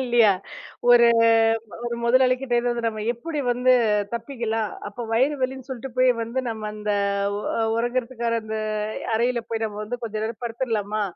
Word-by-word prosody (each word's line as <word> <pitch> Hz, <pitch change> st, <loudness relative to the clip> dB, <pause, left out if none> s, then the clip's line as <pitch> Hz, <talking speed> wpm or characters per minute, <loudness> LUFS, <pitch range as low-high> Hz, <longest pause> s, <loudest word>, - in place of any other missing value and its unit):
இல்லயா? 240 Hz, -4 st, +5 dB, 0.6 s
ஒரு 235 Hz, -1 st, +7 dB, 0.8 s
ஒரு 240 Hz, 0 st, -2 dB
முதலாளி 255 Hz, +1 st, +4 dB
கிட்ட 265 Hz, -3 st, -2 dB
இருந்து 240 Hz, -1 st, -1 dB
நம்ம 215 Hz, -1 st, -5 dB
எப்படி 300 Hz, +6 st, -4 dB
வந்து 250 Hz, +1 st, +3 dB, 0.4 s
தப்பிக்கலாம்? 230 Hz, -3 st, -2 dB, 0.2 s
அப்ப 230 Hz, +3 st, -7 dB
வயிறு 265 Hz, +6 st, +3 dB
வலின்னு 260 Hz, 0 st, -3 dB
சொல்லிட்டு 260 Hz, 0 st, -6 dB
போயி 255 Hz, 0 st, +6 dB
வந்து, 230 Hz, +3 st, -4 dB
நம்ம 215 Hz, -1 st, -5 dB
அந்த 210 Hz, 0 st, -2 dB, 0.5 s
ஒ -, -, -5 dB, 0.4 s
ஒறங்குறதுக்கான 235 Hz, -1 st, -1 dB
அந்த 220 Hz, 0 st, -3 dB, 0.6 s
அறையில 240 Hz, +1 st, +1 dB
போய் 225 Hz, 0 st, -2 dB
நம்ம 210 Hz, -1 st, -5 dB
வந்து, 245 Hz, +3 st, -5 dB
கொஞ்ச 220 Hz, -1 st, -5 dB
நேரம் 225 Hz, +1 st, -5 dB
படுத்துடுலாமா? 225 Hz, -3 st, -2 dB
235 Hz, 150 wpm, -24 LUFS, 225-250 Hz, 0.8 s, ஒரு